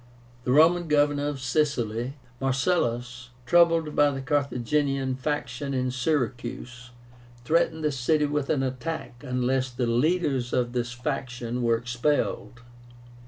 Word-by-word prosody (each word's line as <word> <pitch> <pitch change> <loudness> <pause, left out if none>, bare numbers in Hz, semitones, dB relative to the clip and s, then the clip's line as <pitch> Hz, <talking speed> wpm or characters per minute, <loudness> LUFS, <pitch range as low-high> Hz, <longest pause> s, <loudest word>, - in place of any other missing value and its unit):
The 125 - +1
Roman 165 +5 +5
Governor 145 -1 +2
of 145 -2 -3
Sicily, 130 -4 -1 0.3
MARCELLUS, 125 -4 -1 0.2
troubled 165 +1 +4
by 145 0 +5
the 135 -1 -4
Carthaginian 140 -1 0
faction 140 0 -3
in 130 0 0
Syracuse, 125 -2 -3 0.6
threatened 160 +1 +1
the 150 - +2
city 150 +4 +1
with 145 -1 -2
an 135 -3 +1
attack 130 -1 -5
unless 130 0 0
the 125 0 -2
leaders 135 0 +1
of 120 -1 0
this 120 -1 -2
faction 125 -2 -4
were 115 -1 +3
expelled. 125 +1 -1
135 Hz, 120 wpm, -26 LUFS, 125-150 Hz, 0.6 s, Roman